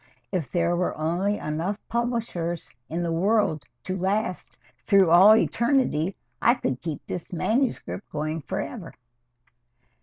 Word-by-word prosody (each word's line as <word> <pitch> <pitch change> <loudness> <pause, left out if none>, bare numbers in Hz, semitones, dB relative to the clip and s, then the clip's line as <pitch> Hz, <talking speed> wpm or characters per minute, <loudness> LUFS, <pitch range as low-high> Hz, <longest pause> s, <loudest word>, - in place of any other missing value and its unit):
If 160 -10 -2
there 170 0 +1
were 180 +1 -1
only 175 +6 0
enough 165 +7 -2
publishers 230 -9 -2 0.2
in 170 +2 -2
the 170 - -1
world 195 -1 +2 0.2
to 185 - -3
last 190 +1 -2 0.2
through 195 -5 +4
all 190 +5 +9
eternity, 225 - +1 0.3
I 240 - +5
could 130 - -3
keep 160 -3 -5
this 175 - -6
manuscript 220 - -1
going 155 +1 -3
forever." 175 - -5
180 Hz, 125 wpm, -25 LUFS, 165-215 Hz, 0.3 s, all